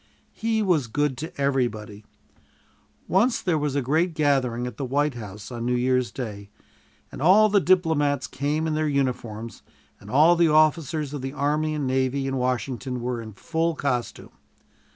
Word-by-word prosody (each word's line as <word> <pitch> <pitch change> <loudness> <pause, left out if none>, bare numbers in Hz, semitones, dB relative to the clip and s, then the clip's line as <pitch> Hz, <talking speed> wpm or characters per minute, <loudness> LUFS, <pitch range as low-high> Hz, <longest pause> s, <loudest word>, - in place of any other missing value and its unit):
He 220 -1 0
was 165 - +1
good 145 +3 0
to 160 -1 -7
everybody. 115 -7 -1 1.0
Once 225 +7 +2
there 170 -4 0
was 145 -2 -2
a 140 - 0
great 160 +6 +1
gathering 135 -6 +1
at 125 -3 -7
the - - -4
White 145 +3 0
House 105 -2 -9
on 120 -1 -5
New 125 - +1
Year's 125 0 +1
Day, 105 -5 -7 0.6
and - - -8
all 200 +7 +6
the 205 0 +4
diplomats 160 -7 +2
came 145 +4 -2
in 160 - -1
their 155 0 0
uniforms, 120 -5 -3 0.4
and 100 - -13
all 155 +8 +5
the 170 -1 +4
officers 155 -1 +2
of 145 - -4
the 135 +1 -5
army 150 +2 0
and 145 -2 -2
navy 130 +1 0
in 135 0 -2
Washington 125 0 -2
were 120 0 -3
in 110 -1 -9
full 165 - -1
costume. 125 -5 -3
140 Hz, 170 wpm, -24 LUFS, 125-155 Hz, 1.0 s, all